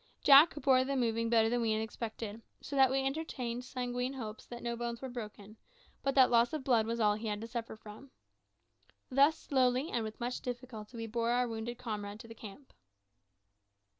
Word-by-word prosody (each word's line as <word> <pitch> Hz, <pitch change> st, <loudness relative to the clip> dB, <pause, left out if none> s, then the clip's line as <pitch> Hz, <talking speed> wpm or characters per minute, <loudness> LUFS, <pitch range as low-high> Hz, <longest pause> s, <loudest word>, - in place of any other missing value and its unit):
Jack 285 Hz, +3 st, +8 dB
bore 265 Hz, -3 st, +3 dB
the 275 Hz, +1 st, -2 dB
moving 230 Hz, -2 st, 0 dB
better 225 Hz, -1 st, +4 dB
than 240 Hz, +1 st, 0 dB
we 225 Hz, -1 st, +1 dB
had 215 Hz, -, 0 dB
expected, 220 Hz, 0 st, -6 dB, 0.2 s
so 285 Hz, -, -7 dB
that 265 Hz, -1 st, +6 dB
we 270 Hz, +1 st, 0 dB
entertained 260 Hz, -4 st, -3 dB
sanguine 250 Hz, 0 st, -3 dB
hopes 220 Hz, -5 st, -7 dB
that 240 Hz, -1 st, -9 dB
no 235 Hz, 0 st, -2 dB
bones 235 Hz, 0 st, -4 dB
were 265 Hz, -, -6 dB
broken, 215 Hz, -3 st, -8 dB, 0.4 s
but 275 Hz, 0 st, -1 dB
that 260 Hz, -2 st, +6 dB
loss 235 Hz, +2 st, +4 dB
of 305 Hz, -3 st, -3 dB
blood 235 Hz, -4 st, +2 dB
was 230 Hz, +1 st, -2 dB
all 210 Hz, -2 st, +4 dB
he 215 Hz, +2 st, -5 dB
had 210 Hz, -1 st, -2 dB
to 225 Hz, -, -6 dB
suffer 230 Hz, -1 st, -5 dB
from. 215 Hz, +5 st, -12 dB, 1.0 s
Thus 280 Hz, +4 st, +4 dB
slowly 260 Hz, +2 st, +1 dB
and 235 Hz, -, -1 dB
with 215 Hz, 0 st, -7 dB
much 245 Hz, +1 st, -3 dB
difficulty 245 Hz, -2 st, -7 dB
we 225 Hz, -, -4 dB
bore 230 Hz, +1 st, -1 dB
our 245 Hz, +1 st, +2 dB
wounded 230 Hz, +1 st, -5 dB
comrade 210 Hz, -4 st, -5 dB
to 230 Hz, -, -12 dB
the 225 Hz, -, -9 dB
camp. 225 Hz, +5 st, -12 dB
240 Hz, 195 wpm, -32 LUFS, 225-260 Hz, 1.0 s, Jack